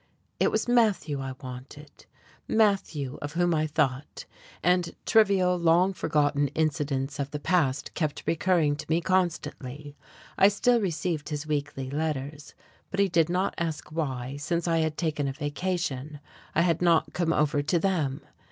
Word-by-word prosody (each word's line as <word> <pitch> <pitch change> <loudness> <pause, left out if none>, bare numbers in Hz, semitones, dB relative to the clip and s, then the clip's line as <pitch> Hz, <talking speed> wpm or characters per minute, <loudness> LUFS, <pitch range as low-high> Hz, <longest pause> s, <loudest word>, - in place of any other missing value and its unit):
It - - +4
was - - -1
Matthew 215 - +2
I 135 -1 -5
wanted, 130 +4 -10 0.4
Matthew 190 - +1
of 145 0 -5
whom 175 0 +2
I 155 -1 +1
thought, 145 -2 -1 0.4
and 180 0 +2
trivial, 195 -5 +4
long 170 +3 +4
forgotten 145 -4 +1
incidents 145 -3 -1
of 140 -1 -2
the 150 - -5
past 145 -5 0
kept 155 -4 -2
recurring 165 -3 +2
to - - -7
me 165 +1 +3
constantly. 150 -6 -2 0.4
I 195 - +8
still 235 +4 +3
received 170 -4 -2
his 150 0 -4
weekly 145 -3 -3
letters; 150 -1 -4 0.3
but 195 - -4
he 200 -1 +4
did 165 -2 +2
not 185 +2 0
ask 160 -3 -3
why, 135 -4 -3
since 170 +4 -2
I 165 -1 +2
had 160 -1 -1
taken 150 -4 -1
a 135 - -2
vacation, 145 -1 -3 0.4
I 170 - +4
had 170 -2 +1
not 165 -3 +3
come 170 -1 0
over 150 -2 +2
to 160 +5 +1
them. 160 -7 0
155 Hz, 155 wpm, -27 LUFS, 145-175 Hz, 0.4 s, I